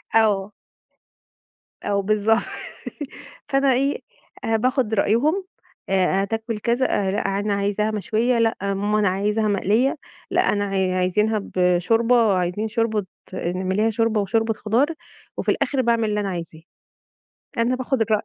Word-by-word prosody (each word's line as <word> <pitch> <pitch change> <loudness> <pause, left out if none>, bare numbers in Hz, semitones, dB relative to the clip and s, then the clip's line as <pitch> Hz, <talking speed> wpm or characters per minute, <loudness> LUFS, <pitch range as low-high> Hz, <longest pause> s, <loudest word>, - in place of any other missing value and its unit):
آه. 210 -3 +3 1.3
آه 200 -1 0
بالضبط. 215 +3 +2 1.1
فأنا 275 -1 +3
إيه، 275 +3 0 0.4
أ 225 - +1
باخد 250 -1 0
رأيهم 280 - +2 0.5
أ-أ - - +2
هتاكل 205 +4 0
كذا 240 +4 +1 0.2
أ - - 0
لأ 205 - 0 0.2
أنا 205 0 0
عايزاها 205 +2 0
مشوية 225 +3 0
لأ 225 -1 +2
ماما 200 +2 0
أنا 205 -2 +3
عايزها 210 +3 0
مقلية. 215 - +1 0.3
لأ - - +3
أنا 205 -1 0
ع 190 -2 0
عايزنها 210 +4 +1 0.2
بشوربة، 210 +4 +3
عايزين 180 +5 -1
شوربة 220 -2 0 0.3
اعمليها 190 +5 0
شوربة 225 -1 +1
وشوربة 225 +3 +1
خضار، 225 +6 +1 0.5
وفي - - -2
الآخر 270 -2 0
باعمل 230 -2 +1
اللي 210 0 0
أنا 200 -1 -1
عايزاه. 165 -3 -6 1.0
أنا 235 +2 +2
باخد 255 -1 -1
الرأي 215 -1 +2
215 Hz, 135 wpm, -22 LUFS, 200-230 Hz, 1.3 s, آه